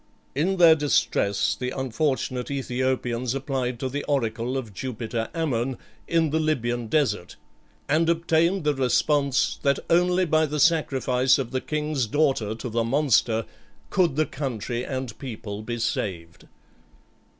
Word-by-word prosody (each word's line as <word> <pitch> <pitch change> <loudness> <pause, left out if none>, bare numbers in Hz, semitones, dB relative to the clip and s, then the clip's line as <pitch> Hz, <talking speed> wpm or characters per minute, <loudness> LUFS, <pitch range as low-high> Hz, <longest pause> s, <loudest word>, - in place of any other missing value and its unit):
In 180 +8 0
their 170 -2 +8
distress 105 -9 +1
the 125 +4 -3
unfortunate 130 -1 -1
Æthiopians 130 -2 -1
applied 130 -3 -2
to 130 - -2
the 145 +3 -3
oracle 120 -2 -1
of 115 -6 -6
Jupiter 115 0 -4
Ammon, 130 -6 -1 0.3
in 165 -3 +2
the 160 - +1
Libyan 120 -7 -1
desert, 110 - 0 0.5
and 160 +3 +2
obtained 170 +2 +2
the 150 0 +2
response, 135 +1 +1
that 140 0 +2
only 180 +2 +3
by 155 -1 +2
the 150 +1 -3
sacrifice 135 -5 +3
of 135 -4 -3
the 130 - -1
king's 150 -5 -1
daughter 130 -5 +1
to 115 - -6
the 115 0 0
monster 120 -3 +2 0.5
could 175 -7 +2
the 155 +1 +2
country 125 -4 -4
and 130 -4 -4
people 110 -6 -6
be 120 +2 -4
saved. 90 -7 -3
130 Hz, 140 wpm, -25 LUFS, 120-150 Hz, 0.5 s, their